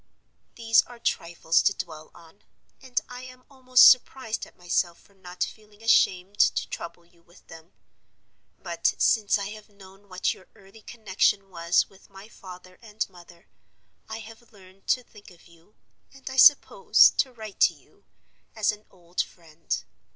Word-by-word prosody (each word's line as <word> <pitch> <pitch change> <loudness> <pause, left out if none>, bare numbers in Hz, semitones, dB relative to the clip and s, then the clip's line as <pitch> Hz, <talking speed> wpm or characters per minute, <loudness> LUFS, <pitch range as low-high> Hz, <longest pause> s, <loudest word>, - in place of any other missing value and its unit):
"These 225 -1 +4
are 245 - -13
trifles 170 -6 0
to 200 - +1
dwell 155 -4 -8
on; 170 +3 -19 0.4
and 255 -1 -2
I 250 0 -9
am 255 0 -14
almost 255 -2 +6
surprised 255 -2 -2
at - - -22
myself 175 -1 -1
for 200 - -25
not 185 -2 -6
feeling 215 0 -11
ashamed 195 -3 +2
to - - +2
trouble 170 0 -8
you 170 0 -29
with 170 +1 -23
them. 165 +2 -14 0.8
But, - - -1
since 215 -2 +2
I 200 -1 -5
have 215 0 -12
known 195 0 -18
what 185 0 -1
your 185 - -19
early 200 +1 -18
connection 200 -3 -1
was 170 0 +1
with 195 0 -22
my 195 +1 -13
father 185 -3 -14
and 220 -1 -4
mother, 175 -1 -17 0.6
I 220 +1 -6
have 225 +2 -15
learned 195 -2 -20
to 250 - +1
think 210 -3 -17
of 175 -2 -20
you 170 +4 -24 0.4
(and, 270 -1 -17
I - - -7
suppose, 290 +2 +6
to 265 - +1
write 220 -4 -11
to - - +4
you) - - -26 0.5
as 220 -1 +1
an 210 0 -13
old 175 -1 -4
friend. 165 -2 -6
195 Hz, 165 wpm, -25 LUFS, 180-225 Hz, 0.8 s, almost